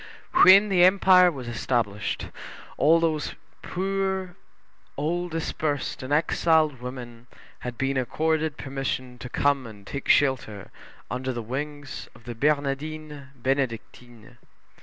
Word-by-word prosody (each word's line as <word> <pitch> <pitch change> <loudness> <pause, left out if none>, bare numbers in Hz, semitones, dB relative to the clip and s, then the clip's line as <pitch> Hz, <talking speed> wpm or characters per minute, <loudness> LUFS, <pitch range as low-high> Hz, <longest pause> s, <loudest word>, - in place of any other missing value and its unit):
When 200 +3 +8
the 180 -2 +4
Empire 185 -1 +6
was 130 -6 -8
established, 120 -4 -2 0.5
all 160 +4 +4
these 160 -2 -1 0.3
poor 190 -1 -2 0.6
old 175 +5 -1
dispersed 155 -3 -3
and 130 +2 -7
exiled 155 -2 +2
women 120 -2 -8 0.3
had 125 -1 -6
been 135 0 0
accorded 155 +4 0
permission 130 -2 -4
to 125 - -7
come 140 -2 +1
and 105 -3 -13
take 140 - -6
shelter 125 -8 +1 0.4
under 130 +1 -2
the 120 -2 -5
wings 145 +3 -6
of - - -17
the 120 - -6
Bernardines 150 +2 -2
Benedictines. 120 -2 -4
140 Hz, 115 wpm, -25 LUFS, 125-160 Hz, 0.6 s, When